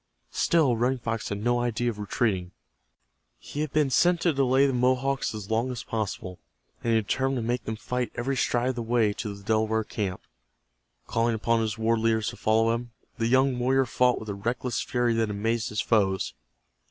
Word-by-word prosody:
Still 155 -8 +3
Running 125 +3 +1
Fox 115 -2 -3
had 100 0 -4
no 120 +1 +2
idea 120 0 0
of 105 - -11
retreating. 100 -3 -1 0.8
He 145 - -6
had 155 -2 -2
been 150 -3 +2
sent 175 +7 +4
to 170 - +2
delay 135 0 +3
the 135 - +1
Mohawks 130 +1 +1
as 105 0 -7
long 115 +3 +1
as 120 -2 -5
possible, 100 -4 -4 0.4
and 115 - +1
he 115 - +4
determined 130 +5 0
to 115 -3 -2
make 120 -1 -1
them 110 - -3
fight 125 +2 -3
every 135 +3 -1
stride 120 0 +1
of 130 - -2
the - - -1
way 115 -2 +2
to 100 0 -5
the 100 - -14
Delaware 110 +1 +1
camp. 100 -4 -4 0.8
Calling 115 0 +1
upon 115 +1 +1
his 110 0 -2
war 115 +1 +1
leaders 110 -1 +1
to - - -8
follow 115 +1 +2
him, 120 +1 -4 0.3
the 115 - +1
young 130 +1 +3
warrior 130 +2 +2
fought 125 0 +2
with 110 - -8
a - - -2
reckless 120 +4 -2
fury 120 -1 0
that 115 -1 +1
amazed 110 +3 -1
his 105 - -1
foes. 95 -4 +1
115 Hz, 200 wpm, -27 LUFS, 110-125 Hz, 0.8 s, sent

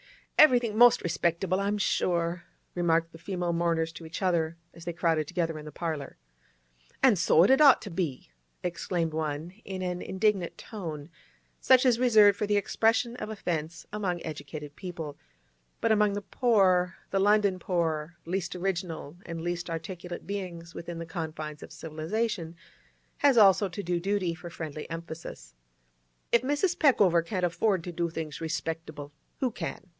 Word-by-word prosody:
'Everythink 245 -7 +6
most 240 +2 +6
respectable, 170 +2 0
I'm 200 +1 0
sure!' 175 -3 0 0.3
remarked 165 -1 +1
the 165 - -13
female 180 -2 -2
mourners 165 -1 0
to 165 - -10
each 165 +4 -6
other, 170 -3 +1 0.2
as 170 - -13
they 175 - -3
crowded 165 -3 +1
together 165 -3 -2
in 150 - -10
the 150 - -8
parlour. 155 -5 -4 0.9
'An' 255 -5 +7
so 165 -1 +5
it 200 - +5
had 270 - +5
ought 280 -4 +7
to 205 - -7
be!' 165 - -3 0.3
exclaimed 170 -2 -2
one, 155 +1 -3
in 190 -1 -5
an 180 -1 -3
indignant 190 -2 0
tone, 165 -9 -7 0.5
such 260 0 +5
as 250 - +6
is 230 - -2
reserved 215 -5 +6
for 210 - 0
the 205 0 +2
expression 225 +3 +1
of - - -5
offence 170 -6 -4
among 190 -4 -1
educated 150 -1 -7
people, 165 -5 -6 0.6
but 230 - +1
among 210 -1 +3
the 205 0 -4
poor—the 195 -6 +2
London 205 -1 +3
poor, 165 -3 -1
least 180 +1 -2
original 175 -4 -3
and 165 -1 -5
least 175 +1 -3
articulate 175 +2 -6
beings 180 -4 -6
within 170 0 -6
the 165 - -5
confines 155 -3 -5
of - - -10
civilisation—has 170 - -3
also 195 -2 +6
to 200 +3 -6
do 175 0 0
duty 190 -1 0
for 175 +1 -9
friendly 155 -3 -7
emphasis. 165 - -8 0.8
'If 235 - +5
Mrs. 290 +7 +1
Peckover 200 - +5
can't 180 +1 -1
afford 180 +1 +1
to 175 - -5
do 170 0 -1
things 160 -2 -6
respectable, 160 -2 -4 0.3
who 255 -2 0
can? - - -6
175 Hz, 160 wpm, -28 LUFS, 165-200 Hz, 0.9 s, An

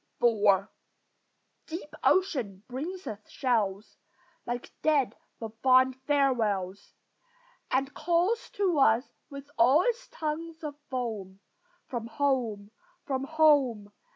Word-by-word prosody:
IV 205 -4 +4 1.0
Deep 320 -2 -7
ocean 245 - +1
brings 335 +9 -5
us 210 - -5
shells, 215 -6 -1 0.5
Like 240 0 -4
dead 295 -5 +2 0.2
but 225 0 -8
fond 260 0 +5
farewells, 220 -10 0 0.7
And 270 +2 0
calls 355 +7 0
to 370 -7 +1
us 240 -1 +3 0.2
with 280 0 -10
all 265 +9 +6
its 485 0 -1
tongues 320 +1 -5
of 300 -1 -4 0.2
foam, 215 -7 -4 0.5
"From 235 -3 -5
home! 230 -6 -1 0.3
from 270 -2 -2
home!" 275 -9 +3
260 Hz, 105 wpm, -29 LUFS, 220-305 Hz, 1.0 s, all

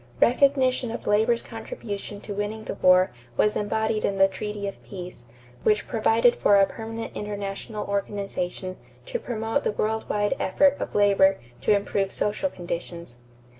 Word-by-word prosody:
Recognition 260 -1 +3
of 230 - -6
labor's 220 +3 +2
contribution 205 - -7
to 205 - -6
winning 205 +2 -3
the - - -4
war 185 -1 +5 0.3
was 210 - +3
embodied 220 +1 0
in 195 - 0
the 195 0 +6
treaty 205 +1 -5
of 195 - -7
peace, 180 -9 -9 0.4
which 210 +7 +2
provided 230 +1 +3
for 205 - +4
a 195 0 +6
permanent 225 +2 -7
international 205 +1 -4
organization 195 -2 -3 0.3
to - - -3
promote 225 - -2
the - - 0
world 220 +1 -1
wide 205 +3 +1
effort 285 -1 +3
of - - -4
labor 195 -1 +5 0.2
to 210 - +4
improve 200 -1 -1
social 210 +7 0
conditions. 170 - -6
205 Hz, 150 wpm, -25 LUFS, 195-225 Hz, 0.4 s, the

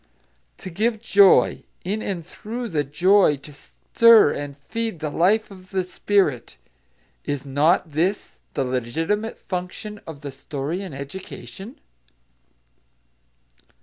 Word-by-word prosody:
To 185 - -8
give 220 +5 0
joy; 200 -3 +5 0.2
in 205 +4 -2
and 180 -6 -4
through 230 +6 -6
the 155 -5 0
joy 175 +3 +3
to 145 +2 -12
stir 230 +6 +4
and 145 -1 -6
feed 220 +6 -4
the 150 -1 -3
life 205 +8 +2
of 185 -1 -14
the 190 -2 -1
spirit: 180 - 0 0.7
is 145 -1 -3
not 155 +5 +2
this 175 +7 -1 0.2
the - - +1
legitimate 160 - -2
function 190 +3 -6
of 150 -4 -9
the 145 -2 -6
story 140 +5 -4
in 195 - -7
education? 160 - -9
180 Hz, 120 wpm, -23 LUFS, 145-205 Hz, 0.7 s, joy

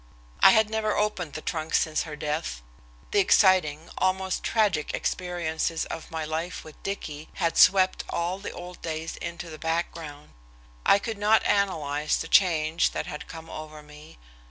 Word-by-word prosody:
I - - +9
had 220 +2 +5
never 215 -1 -1
opened 200 -7 -1
the 155 - -6
trunk 160 -1 -2
since 160 0 +1
her 150 - -6
death. - - -3 0.5
The 205 - +3
exciting, 185 -6 +4
almost 190 0 0
tragic 200 -9 +1
experiences 170 -2 -2
of 160 - -7
my 160 -2 -4
life 160 +3 -4
with 155 - -14
Dicky 155 -6 -5
had 165 -1 0
swept 185 +1 +5
all 175 +3 -2
the 200 - -6
old 180 0 -9
days 160 0 -4
into 170 0 -6
the 155 - -9
background. 160 -3 -4 0.6
I - - +7
could 215 +1 -5
not 215 +2 +4
analyze 155 -7 +1
the - - -4
change 165 -3 +3
that - - -3
had 150 - -7
come 165 0 -9
over 155 -1 -9
me. 150 - -14
165 Hz, 160 wpm, -26 LUFS, 155-190 Hz, 0.6 s, I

